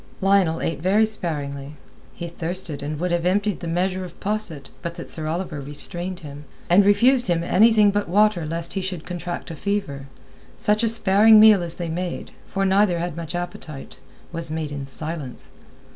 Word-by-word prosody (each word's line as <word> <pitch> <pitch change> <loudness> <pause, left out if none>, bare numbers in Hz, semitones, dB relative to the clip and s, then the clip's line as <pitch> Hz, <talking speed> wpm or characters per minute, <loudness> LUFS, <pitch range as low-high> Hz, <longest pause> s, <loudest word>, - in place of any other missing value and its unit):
Lionel 195 -4 +3
ate 160 -3 -2
very 200 +5 +4
sparingly. 145 -8 -4 0.4
He 170 - -5
thirsted 170 -3 -4
and 150 +1 -4
would 180 +1 -1
have 175 -1 0
emptied 200 +2 +1
the 170 - -6
measure 185 +2 -1
of 180 -2 -10
posset, 190 -9 -3
but 170 -1 -5
that - - -7
Sir 155 -1 -1
Oliver 165 -2 -3
restrained 175 +6 -5
him, 145 -1 -9 0.3
and 195 +3 +7
refused 240 +5 +4
him 170 -2 +1
anything 210 +3 +5
but 205 -3 -1
water 205 -1 +3
lest 165 +2 -4
he 195 - -2
should 185 -4 -4
contract 175 0 -5
a - - -6
fever. 165 -7 -3 0.5
Such 210 +1 +2
a 230 - +2
sparing 215 0 +5
meal 215 -3 +7
as 170 -1 -4
they 175 - -4
made—for 180 +3 -4
neither 190 -2 +3
had 170 -1 -3
much 165 0 -5
appetite—was 165 0 -7
made 155 -1 -3
in 140 -2 -5
silence. 150 -1 -6
175 Hz, 175 wpm, -23 LUFS, 160-195 Hz, 0.5 s, and